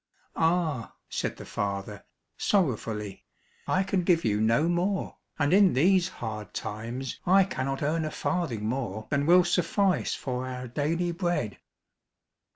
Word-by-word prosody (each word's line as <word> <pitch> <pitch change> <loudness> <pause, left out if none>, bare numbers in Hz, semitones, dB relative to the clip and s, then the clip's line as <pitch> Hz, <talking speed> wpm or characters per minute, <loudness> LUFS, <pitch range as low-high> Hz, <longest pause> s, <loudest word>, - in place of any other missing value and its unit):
"Ah," 160 -7 0
said - - -2
the - - -9
father, 100 0 -4 0.3
sorrowfully, 110 - -1 0.4
"I 185 - +2
can 190 -1 0
give 170 -2 +2
you 105 -1 +1
no 115 +8 +3
more, 180 +3 -1 0.2
and 145 +2 +2
in 195 -1 +6
these 180 +6 +4
hard 105 - -6
times 120 +5 -5
I 190 +2 +6
cannot 135 -6 -3
earn 155 +2 0
a - - -2
farthing 155 - -2
more 110 -3 -3
than 140 0 +1
will 180 +1 +7
suffice 180 +1 +1
for 125 0 -4
our 125 0 -5
daily 165 +7 -1
bread." 170 - -2
145 Hz, 140 wpm, -28 LUFS, 115-175 Hz, 0.4 s, will